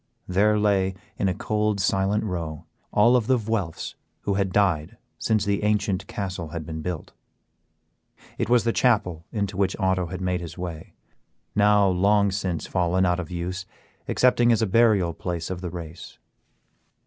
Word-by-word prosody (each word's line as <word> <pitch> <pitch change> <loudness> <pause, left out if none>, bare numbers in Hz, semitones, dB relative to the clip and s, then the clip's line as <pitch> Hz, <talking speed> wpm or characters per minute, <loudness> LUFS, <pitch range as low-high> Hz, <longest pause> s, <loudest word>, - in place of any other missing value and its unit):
There 105 +4 +3
lay, 100 -3 +2 0.2
in 95 - +2
a - - 0
cold, 105 0 0
silent 100 +1 +1
row, 85 -6 -4 0.3
all 120 +4 +5
of 115 -3 +2
the 130 - +4
Vuelphs 105 -7 -3 0.3
who 100 - -1
had 95 -1 0
died 90 -7 +1 0.2
since 110 -1 +1
the 100 -1 0
ancient 105 -2 0
castle 90 -4 -4
had 80 0 -6
been 80 0 -5
built. 85 -1 -5 1.3
It - - -1
was 120 -1 +4
the 115 0 +1
chapel 100 -10 +1
into 100 -3 -2
which 95 -1 +1
Otto 95 -2 +1
had 95 +1 -6
made 90 -1 -1
his 85 0 -8
way, 85 -3 -7 0.6
now 105 -1 +4
long 100 +2 +3
since 95 -4 -2
fallen 90 +1 +1
out 90 0 +1
of 85 - -5
use 90 +2 -4 0.4
excepting 120 -1 +4
as 115 -1 +3
a - - +4
burial 105 -5 +3
place 85 0 -4
of 90 -1 -4
the 90 - -4
race. 85 -2 -9
95 Hz, 165 wpm, -25 LUFS, 90-105 Hz, 1.3 s, all